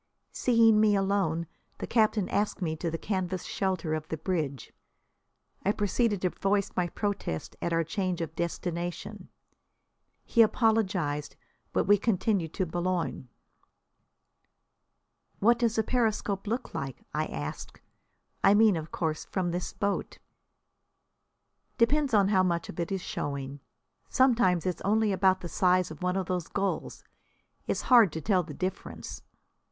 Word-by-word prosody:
Seeing 230 -3 +4
me 210 -1 +4
alone 195 -4 +1 0.3
the - - -4
captain 215 -4 +2
asked 205 +1 0
me 160 -4 -1
to 165 +2 -3
the 165 - -3
canvas 185 -1 -2
shelter 185 -5 -2
of 155 0 -3
the 160 - -4
bridge. 155 - -3 0.9
I 200 - +3
proceeded 205 -1 0
to 180 - +2
voice 200 0 0
my 175 -1 0
protest 200 - -3
at 170 - -1
our 165 0 +2
change 180 +2 -2
of 165 -1 -4
destination. 170 0 -4 1.0
He 235 - +4
apologised, 205 - +1 0.4
but - - +1
we 205 +1 +5
continued 195 -5 0
to 190 - 0
Boulogne. 175 -5 -2 2.1
"What 235 +3 +4
does 230 -2 +1
a 220 - +3
periscope 215 -4 0
look 235 +5 -3
like?" 135 -2 -5
I 155 +1 0
asked. 75 0 -6 0.6
"I 200 - +6
mean, 215 -2 +5
of 160 0 -6
course, 160 -2 -2
from 180 -3 -2
this 175 +1 -3
boat?" 200 -1 -2 1.6
"Depends 280 +4 +3
on 200 -3 +4
how 190 -3 +4
much 170 -2 0
of 160 - -8
it 170 - -2
is 195 -1 -1
showing. 140 -3 -4 0.5
Sometimes 235 -10 +3
it's 180 -2 -2
only 215 +1 +2
about 190 0 +3
the 175 - -5
size 180 0 +2
of 155 - -10
one 180 0 0
of 190 - -1
those 180 -2 -2
gulls. 200 0 -3 0.6
It's - - -1
hard 235 - +6
to 160 - -3
tell 190 +1 +2
the 155 -4 -9
difference." 185 +4 -5
185 Hz, 145 wpm, -28 LUFS, 170-210 Hz, 2.1 s, I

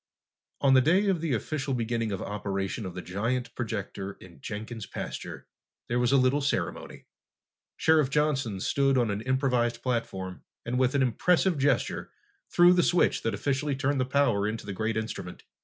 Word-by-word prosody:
On 135 -1 +5
the 130 - +7
day 185 +9 +3
of 180 -4 +1
the 155 -6 0
official 135 +3 -2
beginning 115 -2 -1
of 95 - -3
operation 100 0 -3
of 90 - -8
the 90 - -5
giant 120 +6 -2
projector 100 -5 -4
in 85 -8 -16
Jenkin's 110 - -6
pasture, - - -6 0.4
there 120 +1 +1
was 125 +1 +2
a 140 - +5
little 130 +3 +3
ceremony. 140 - -3 0.7
Sheriff 155 -4 +4
Johnson 135 -8 0
stood 135 +3 +2
on 120 -4 +2
an 100 +1 -3
improvised 125 -2 0
platform 95 -7 -3 0.2
and 125 +2 -1
with 130 +1 +2
an 140 - +4
impressive 170 - +2
gesture 145 +2 0 0.4
threw 175 +1 +6
the 180 - +4
switch 175 0 +2
that 115 -2 -1
officially 140 +5 -1
turned 140 0 0
the - - +1
power 130 -7 +2
into 110 +1 -4
the 100 - -4
great 110 +3 -1
instrument. 110 0 -5
125 Hz, 175 wpm, -28 LUFS, 110-140 Hz, 0.7 s, the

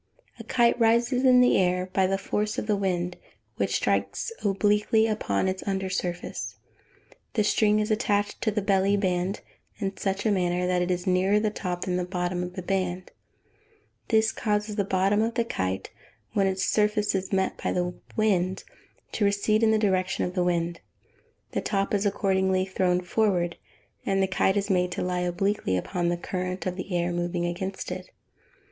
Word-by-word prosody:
_ - - -25
A - - -7
kite 240 0 +2
rises 235 +3 +3
in 250 -1 +7
the 250 - +4
air 180 0 +1
by 190 -1 +3
the 195 +1 0
force 210 +2 -2
of - - -2
the 210 -1 +1
wind, 180 -3 -1 0.4
which - - 0
strikes - - 0
obliquely 210 +2 +3
upon 210 - 0
its 185 0 -2
under 190 -1 -1
surface. 180 -1 -3 0.8
The 215 - +2
string 210 0 +3
is 215 +1 -1
attached 205 -2 0
to 220 - +1
the 210 -1 -1
"belly 195 0 +3
band" 185 0 -1 0.4
in 195 -2 -3
such 195 +1 -2
a 215 - +3
manner 180 -2 +1
that 180 0 +1
it 180 - -1
is 180 0 -1
nearer 190 +2 +3
the 215 0 0
top 180 -4 -4
than 180 -1 0
the 180 - 0
bottom 180 0 -2
of 180 0 -5
the 185 - -5
band: 185 -1 -2 1.0
this 220 -1 +3
causes 210 -1 -1
the 205 - +1
bottom 195 +2 +2
of 230 +1 -1
the 235 -1 +1
kite, 95 - -3 0.4
when 195 -1 +2
its 190 0 0
surface 210 0 +1
is 190 -1 -2
met 190 -1 0
by - - 0
the 180 0 -1 0.2
wind, 190 -4 +1 0.5
to 215 - -1
recede 205 +2 +2
in 225 - +4
the 220 - +4
direction 190 -3 +1
of 180 - -4
the 180 -1 +1
wind: 170 -1 -1 0.7
the - - -1
top 195 -1 -1
is 205 0 +2
accordingly 190 -2 +1
thrown 185 -1 +1
forward, 180 -3 +1 0.5
and 195 0 +1
the - - +4
kite 190 +1 +1
is 200 - 0
made 180 -2 +1
to - - -2
lie 180 0 -1
obliquely 180 - 0
upon 175 - -2
the 175 - 0
current 185 +1 -4
of 185 0 -2
air 175 -1 0
moving 175 0 -1
against 190 +3 -4
it. - - -6
190 Hz, 185 wpm, -26 LUFS, 180-210 Hz, 1.0 s, in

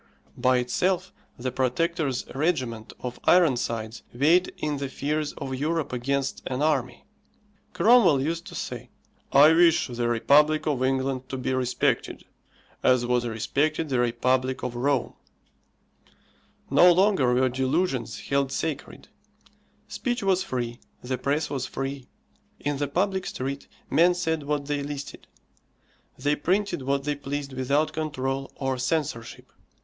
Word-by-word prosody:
By 130 0 +3
itself 185 +9 0 0.2
the 130 +1 -3
Protector's 135 +2 -1
regiment 130 -7 -1
of 125 -1 -5
Ironsides 120 -9 +2
weighed 160 +9 +3
in 150 -1 -2
the 140 -1 -4
fears 150 +3 -2
of 135 -1 -6
Europe 150 +1 -1
against 135 +2 -1
an 130 +2 -2
army. 140 -5 0 0.7
Cromwell 215 - +5
used 165 +5 -2
to - - -9
say, - - -6 0.4
"I 150 +3 +7
wish 170 0 +5
the 120 -1 -2
Republic 150 +7 +3
of 140 -4 0
England 130 0 -1
to 135 - -4
be 130 0 -2
respected, 125 -1 -1 0.6
as 125 -1 +3
was 120 0 +1
respected 145 +8 -1
the 130 -2 +1
Republic 130 +2 0
of 125 -1 -3
Rome." 130 +1 0 1.6
No 180 - +7
longer 180 -9 +3
were 130 +1 +3
delusions 130 -2 -1
held 140 -1 0
sacred; 150 0 -4 0.8
speech 245 -3 -3
was 190 -1 +2
free, 120 -6 -4 0.2
the 125 0 -3
press 145 +4 0
was 135 -3 -3
free. 135 -1 -5 0.5
In 145 0 -2
the 145 +1 -1
public 190 +5 -1
street 135 +2 -4 0.2
men 175 +2 +4
said 160 -3 -1
what 145 0 -2
they 145 0 -2
listed; 140 0 -7 0.9
they 145 +3 +1
printed 190 +3 0
what 140 +1 -1
they 150 +1 0
pleased 140 0 -5
without 140 +4 0
control 135 -3 -3
or 135 -2 -2
censorship. 130 -3 -3
140 Hz, 135 wpm, -26 LUFS, 130-155 Hz, 1.6 s, I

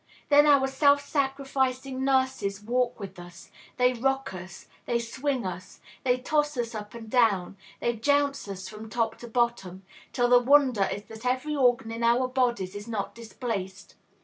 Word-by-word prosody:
Then 295 +1 +6
our 280 -2 +5
self 285 +1 +4
sacrificing 270 -2 -1
nurses 260 -7 0
walk 245 +2 0
with 195 -3 -8
us; 175 +1 -12 0.3
they 250 0 +4
rock 270 -1 -1
us, 185 0 -10 0.2
they 235 - +1
swing 255 +1 -2
us, 180 0 -7 0.2
they 250 -1 +2
toss 295 +2 0
us 235 -1 -2
up 210 0 -7
and 230 -1 -9
down, 215 -6 +2 0.3
they 240 - +1
jounce 285 +2 +1
us 190 -1 -6
from 215 +2 -9
top 225 -1 -1
to 240 - -9
bottom, 225 -6 -1 0.3
till 245 -1 +1
the 245 0 +7
wonder 250 -6 +4
is 205 - -4
that 220 +1 -12
every 255 +4 -1
organ 245 -4 +2
in 230 +1 -5
our 240 +2 +3
bodies 240 -7 0
is 205 +2 -8
not 215 -4 -3
displaced. 215 -5 -6
240 Hz, 170 wpm, -27 LUFS, 210-265 Hz, 0.3 s, the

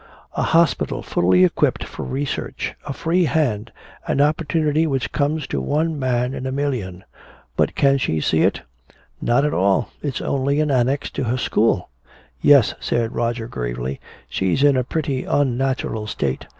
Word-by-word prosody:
A - - -1
hospital 165 -1 +2
fully 90 +1 +3
equipped 90 - +2
for - - -8
research, 135 +2 -3
a - - -2
free 170 +5 +1
hand, 120 -9 0 0.4
an - - 0
opportunity 155 +1 +2
which 135 -4 -1
comes 150 +1 0
to - - -3
one 155 +1 0
man 125 -1 0
in 130 - -4
a - - -2
million! 125 -10 -3 0.5
But - - +1
can 140 -1 +3
she 80 -10 0
see - - +1
it? - - +2 0.6
Not 125 +4 +2
at 150 - 0
all! 95 +1 +2
It's 145 -3 -3
only 140 +2 0
an 155 -1 +1
annex 135 +2 +1
to 135 - -3
her 120 +2 0
school!" 110 -6 +1 0.5
"Yes," 140 -6 +6
said 115 -1 -1
Roger 115 -1 -1
gravely, 60 - -4 0.3
"she's 95 +9 0
in 145 -1 +5
a 130 - +2
pretty 140 -1 -2
unnatural 130 -5 0
state. 70 -10 -3
135 Hz, 160 wpm, -21 LUFS, 115-145 Hz, 0.6 s, Yes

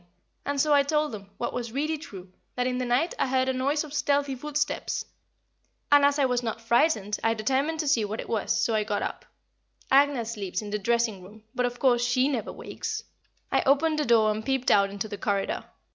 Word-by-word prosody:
and 285 0 -1
so 300 +1 +3
I 285 - +6
told 300 +1 0
them, 200 -2 -8
what - - -3
was 240 -2 -4
really 300 +5 -1
true, 190 - -11 0.2
that 250 - 0
in 250 0 -1
the 255 - -1
night 250 +8 +1
I - - +2
heard 260 0 +1
a 260 - +1
noise 280 +4 0
of 300 -2 -10
stealthy 285 -1 +1
footsteps, 295 +3 -2 0.9
and 290 0 +7
as 285 0 +4
I 280 - +3
was 250 -1 +1
not 230 -1 -3
frightened 230 -3 +1
I 225 0 +2
determined 270 +8 0
to 305 - -4
see 250 -6 +3
what 210 +2 -4
it - - -5
was, 220 -3 -1
so 230 - +1
I 215 -1 +2
got 205 -1 -2
up - - -5 0.7
Agnès 270 -4 +3
sleeps 195 -2 -4
in 205 - -7
the 210 - -1
dressing 230 -2 0
room, 210 +4 -14
but, 250 0 +1
of 245 0 -7
course, 245 -2 +3
she 255 +2 +2
never 245 -7 -2
wakes - - -5 0.5
I - - +3
opened 305 +3 +3
the 300 - +1
door 225 -2 +4
and 215 +1 -3
peeped 265 +1 0
out 200 -1 +4
into 200 +2 -4
the 205 -2 -7
corridor. 200 -2 -1
245 Hz, 220 wpm, -27 LUFS, 215-285 Hz, 0.9 s, and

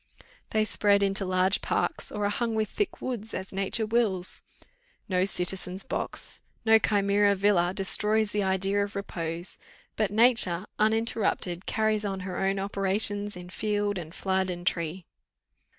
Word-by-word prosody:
they 215 0 +1
spread 200 -1 +2
into 195 0 +1
large 185 +1 +2
parks, - - -1
or 210 -1 -2
are - - +2
hung 230 +1 -1
with 215 -1 0
thick 415 - -3
woods, 230 -4 -4
as 190 +1 -6
nature 195 +4 0
wills. 210 -5 +1 0.7
No 185 -1 +1
citizen's 185 0 -2
box, - - -2 0.2
no 220 0 +6
chimera 200 -1 +2
villa 190 -3 +2
destroys 210 +2 +2
the 210 - 0
idea 195 +1 +1
of 200 - -7
repose; 170 -3 -5 0.4
but 215 -2 +1
nature, 210 -5 +4
uninterrupted, 215 -4 0
carries 220 -1 0
on 195 -2 -3
her 185 -1 -5
own 195 +1 0
operations 200 +1 -1
in 180 0 -10
field, 205 -1 -1
and 165 0 -9
flood, 190 -1 0
and 175 -1 -5
tree." 170 +1 -2
200 Hz, 150 wpm, -27 LUFS, 185-215 Hz, 0.7 s, no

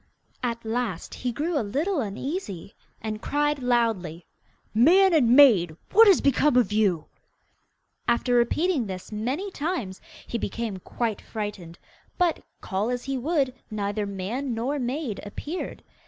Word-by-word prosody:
At 235 -2 -3
last 220 -6 -3
he 245 - -3
grew 300 +5 -1
a - - +1
little 295 - -1
uneasy, 210 - -5 0.3
and 215 -1 -4
cried 295 0 0
loudly, 225 -9 0 0.5
'Man 350 - +6
and 250 -6 +5
maid! 195 - +6
what 450 +2 +8
has 390 - +6
become 280 0 +3
of 235 -5 +3
you?' 200 -7 +2 1.0
After 240 +1 +2
repeating 255 - +2
this 185 +1 -7
many 260 - -2
times, 290 - -3 0.2
he 235 - -3
became 220 -1 -3
quite 220 +3 -3
frightened, 205 -6 -6 0.4
but, 355 -3 +1 0.2
call 200 +4 -1
as 245 0 -2
he 275 0 -3
would, 275 0 0 0.2
neither 205 -1 -2
man 225 +7 -3
nor 265 +6 -1
maid 250 -2 -3
appeared. 295 - -6
240 Hz, 140 wpm, -26 LUFS, 205-290 Hz, 1.0 s, what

